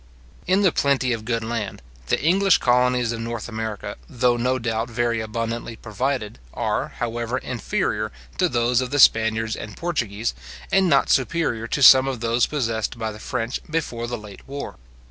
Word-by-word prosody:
In 190 +3 +3
the 185 - +5
plenty 135 -4 +1
of 110 -1 -5
good 115 -1 -1
land, 110 -3 -3 0.3
the - - +1
English 190 +3 +4
colonies 125 -1 +2
of 115 - -4
North 115 -1 -4
America, 110 -3 -5
though 125 -3 +2
no 125 +2 0
doubt 115 -1 -2
very 120 -1 0
abundantly 115 +1 -4
provided, 110 - -3 0.2
are, - - -1
however, 120 +1 -2
inferior 110 -4 -2 0.3
to 180 -2 +3
those 120 0 +2
of 130 - -3
the 145 - -1
Spaniards 110 -3 +4
and 105 -1 -8
Portuguese, 120 - -2 0.4
and 195 -2 +4
not 140 -3 +3
superior 130 -5 +1
to 140 - 0
some 130 +1 +9
of 130 -3 -3
those 115 +1 +2
possessed 115 -6 -2
by 110 -1 -3
the 105 - -10
French 115 +2 -3
before 125 -7 -2
the 120 0 -3
late 105 -2 -12
war. 140 +1 -6
120 Hz, 170 wpm, -23 LUFS, 115-130 Hz, 0.4 s, some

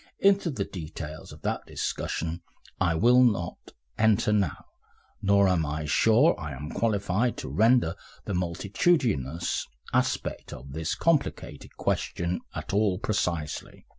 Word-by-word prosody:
Into 195 -2 +3
the 110 -10 -2
details 80 -3 -7
of - - -13
that - - -1
discussion 85 +1 -3 0.4
I 85 -3 +2
will 120 +8 +5
not 100 -8 +1 0.4
enter 110 0 +3
now, 100 -7 0 0.6
nor 100 0 +4
am 90 -3 +2
I 75 0 -3
sure 115 - +4
I 75 -4 -5
am 75 +4 -7
qualified 105 +1 0
to - - -5
render 115 -6 +3 0.3
the 100 - -3
multitudinous 90 - 0 0.3
aspect - - -1
of 65 +2 -10
this 80 +2 -2
complicated 165 -4 -1
question 85 +1 -1 0.2
at - - -5
all 100 -2 +2
precisely. 85 -7 -3
95 Hz, 130 wpm, -27 LUFS, 80-115 Hz, 0.6 s, will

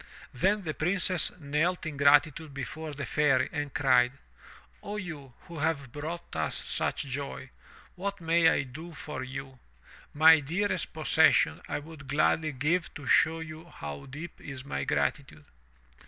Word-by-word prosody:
Then 195 +10 +1
the 155 -3 -3
Princess 180 +2 0
knelt 160 +4 0
in 155 -2 -4
gratitude 145 +1 +3
before 155 +2 -5
the 140 - -4
Fairy 140 -4 +2
and 145 -3 -3
cried: 125 -3 +4 0.7
0 205 - -5
you, 155 -10 -7
who 170 -2 -9
have 145 -4 -1
brought 155 - -6
us 80 -1 -1
such - - -1
joy 135 -1 -5 0.2
— - - -23
what 200 +2 -4
may 165 0 +4
I 150 - +1
do 160 +6 -10
for 150 -2 -6
you? 135 0 -7 0.5
My 160 +2 +7
dearest 175 +8 -1
possession - - +3
I - - -1
would 150 -2 -10
gladly 155 +2 +2
give 155 +7 0
to 145 - -8
show 165 +4 +4
you 160 0 -8
how 75 - -8
deep 150 +6 -9
is 140 -2 -7
my - - -3
gratitude." 75 - -1
150 Hz, 155 wpm, -29 LUFS, 140-165 Hz, 0.7 s, My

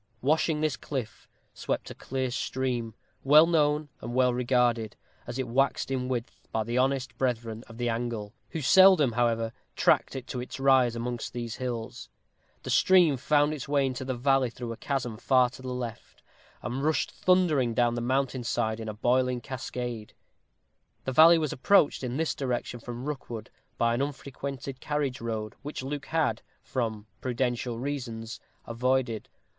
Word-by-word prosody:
Washing 155 +2 +2
this 155 -3 0
cliff, 120 -9 -5 0.3
swept - - -3
a - - -5
clear 130 -1 -3
stream, 120 -3 -2 0.3
well 150 +4 +8
known 150 -2 +2
and 120 +2 -5
well 125 -1 +4
regarded, 120 -3 +1 0.3
as 120 +1 -5
it 130 - -2
waxed 135 +2 +1
in 130 -1 -1
width, 120 -2 -5
by 110 - 0
the 115 +2 -4
honest 130 +1 +1
brethren 115 -3 -1
of 115 - -12
the 120 0 -1
angle, 115 -3 -3 0.2
who 160 - -4
seldom, 180 -1 +6
however, 115 -1 0 0.2
tracked - - +3
it 130 -2 -5
to 125 - -5
its 125 - -7
rise 130 -3 +4
amongst 120 0 -4
these 120 -2 -4
hills. 120 -3 -5 0.5
The - - -4
stream 180 -6 +5
found 145 +3 +2
its 140 -4 -6
way 140 -1 +2
into 130 -1 -3
the 130 -1 -3
valley 135 0 +2
through 120 0 -6
a 115 - -6
chasm 125 -6 -2
far 125 +1 +3
to 130 - -12
the 130 - -7
left, 120 -3 -6 0.4
and 125 +3 -3
rushed 155 +1 +1
thundering 155 -10 +2
down 120 0 +3
the 120 - -2
mountain 130 +1 0
side 110 -1 -1
in 110 -1 -5
a 105 - -5
boiling 125 +2 +1
cascade. 120 -3 -5 0.9
The 130 - -1
valley 165 +5 +8
was 155 -3 -1
approached 150 +1 +3
in 125 +1 -2
this 160 0 0
direction 125 -2 -3
from 120 +2 -7
Rookwood 120 -7 -6 0.3
by 115 0 +2
an 120 - 0
unfrequented 140 -1 -5
carriage 145 -4 -2
road, 110 -2 -3
which 145 -2 -6
Luke 145 +1 -5
had, 155 -9 0 0.2
from 110 -5 -3 0.2
prudential 120 -1 -1
reasons, 120 -4 -5 0.3
avoided. 120 -1 0
125 Hz, 165 wpm, -28 LUFS, 120-140 Hz, 0.9 s, well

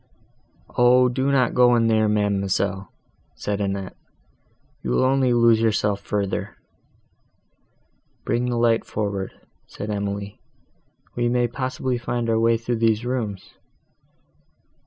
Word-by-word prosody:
"O! 125 +1 +5
do 130 +3 0
not 130 -3 +2
go 125 -1 +5
in 115 -1 +2
there, 110 -1 +2
ma'amselle," 100 -2 -1 0.4
said 105 0 -3
Annette, 100 -1 -3 0.9
"you 65 - -5
will 60 - +2
only 130 -1 +2
lose 115 -2 +4
yourself 105 -2 +1
further." 100 -1 -3 1.7
"Bring 125 +1 0
the 120 - -1
light 115 -1 +2
forward," 100 -2 -3 0.4
said 105 +1 -6
Emily, 100 0 -4 0.8
"we 120 0 0
may 120 0 +1
possibly 130 0 -3
find 120 -1 -2
our 110 - +2
way 115 0 +3
through 115 +1 -3
these 110 0 +1
rooms." 110 -7 -4
115 Hz, 120 wpm, -23 LUFS, 100-120 Hz, 1.7 s, O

